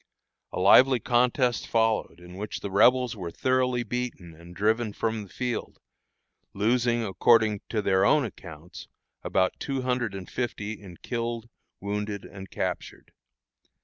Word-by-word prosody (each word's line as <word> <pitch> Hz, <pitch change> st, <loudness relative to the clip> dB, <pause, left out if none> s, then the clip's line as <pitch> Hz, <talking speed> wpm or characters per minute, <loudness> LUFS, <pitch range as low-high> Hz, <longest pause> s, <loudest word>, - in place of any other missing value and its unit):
A -, -, -4 dB
lively 125 Hz, +7 st, +6 dB
contest 120 Hz, +1 st, +1 dB
followed, 110 Hz, -6 st, +1 dB
in 90 Hz, 0 st, -13 dB
which 105 Hz, +2 st, -5 dB
the 100 Hz, -, -5 dB
Rebels 125 Hz, +4 st, +4 dB
were 90 Hz, -5 st, -5 dB
thoroughly 125 Hz, +3 st, +1 dB
beaten 120 Hz, -9 st, -5 dB
and 85 Hz, +2 st, -14 dB
driven 110 Hz, +2 st, +1 dB
from 110 Hz, 0 st, -2 dB
the 100 Hz, -, -11 dB
field, 125 Hz, +2 st, -4 dB, 0.8 s
losing, 120 Hz, +3 st, +1 dB
according 110 Hz, 0 st, +3 dB
to 110 Hz, -2 st, -1 dB
their 95 Hz, -1 st, +3 dB
own 150 Hz, -3 st, +4 dB
accounts, 85 Hz, -6 st, -10 dB, 0.3 s
about 95 Hz, -1 st, 0 dB
two 135 Hz, -2 st, -3 dB
hundred 125 Hz, -5 st, -1 dB
and 95 Hz, -2 st, -7 dB
fifty 110 Hz, -4 st, -3 dB
in 90 Hz, -4 st, -12 dB
killed, 115 Hz, -1 st, -4 dB, 0.3 s
wounded, 105 Hz, 0 st, -4 dB
and 95 Hz, 0 st, -10 dB
captured. -, -, -5 dB
110 Hz, 140 wpm, -27 LUFS, 100-120 Hz, 0.8 s, lively